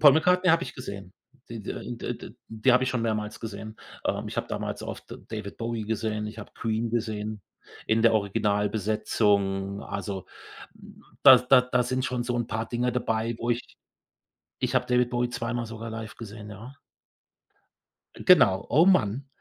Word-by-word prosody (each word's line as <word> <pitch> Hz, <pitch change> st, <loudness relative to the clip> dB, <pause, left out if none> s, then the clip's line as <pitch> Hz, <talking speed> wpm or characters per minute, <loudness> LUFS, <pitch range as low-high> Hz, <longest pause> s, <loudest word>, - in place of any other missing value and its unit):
Paul 145 Hz, -3 st, +9 dB
McCartney 180 Hz, +4 st, +3 dB
habe 165 Hz, +2 st, +4 dB
ich -, -, -8 dB
gesehen, 100 Hz, -7 st, -8 dB, 0.4 s
d 115 Hz, -1 st, -6 dB
d 115 Hz, +3 st, -5 dB
d -, -, -11 dB
die 110 Hz, +3 st, +2 dB
hab 125 Hz, +1 st, +5 dB
ich 130 Hz, -, +1 dB
schon 125 Hz, -3 st, -1 dB
mehrmals 110 Hz, -2 st, -2 dB
gesehen. 110 Hz, 0 st, -7 dB, 0.3 s
Ähm, -, -, -1 dB
ich -, -, -8 dB
hab -, -, -2 dB
damals -, -, -4 dB
oft -, -, -6 dB, 0.2 s
David 105 Hz, -2 st, -6 dB
Bowie 115 Hz, -1 st, -3 dB
gesehen, 110 Hz, 0 st, -2 dB
ich 105 Hz, +1 st, -8 dB
habe 105 Hz, -, -9 dB
Queen 115 Hz, 0 st, -1 dB
gesehen 110 Hz, -2 st, -2 dB, 0.5 s
in 110 Hz, +1 st, +2 dB
der 115 Hz, -1 st, +5 dB
Originalbesetzung. 100 Hz, -1 st, +1 dB
Also, 100 Hz, -1 st, -5 dB, 1.0 s
da 135 Hz, -2 st, +11 dB
da 125 Hz, +1 st, +5 dB
da 125 Hz, 0 st, +1 dB
sind 130 Hz, +1 st, -1 dB
schon 125 Hz, -2 st, -1 dB
so 120 Hz, 0 st, -1 dB
'n 120 Hz, -1 st, -1 dB
paar 110 Hz, +1 st, -3 dB
Dinge 125 Hz, +1 st, 0 dB
dabei, 115 Hz, -1 st, -1 dB
wo 120 Hz, -, -1 dB
ich 120 Hz, +1 st, -3 dB, 0.8 s
Ich -, -, -1 dB
hab -, -, +2 dB
David 125 Hz, 0 st, +3 dB
Bowie 120 Hz, 0 st, 0 dB
zweimal 120 Hz, -1 st, -3 dB
sogar 115 Hz, 0 st, -7 dB
live 110 Hz, -1 st, -7 dB
gesehen, 105 Hz, -2 st, -9 dB
ja. 105 Hz, +6 st, -10 dB, 1.4 s
Genau, 95 Hz, 0 st, +5 dB
oh, 165 Hz, +5 st, +5 dB
Mann. 130 Hz, -, +3 dB
115 Hz, 165 wpm, -27 LUFS, 105-125 Hz, 1.4 s, da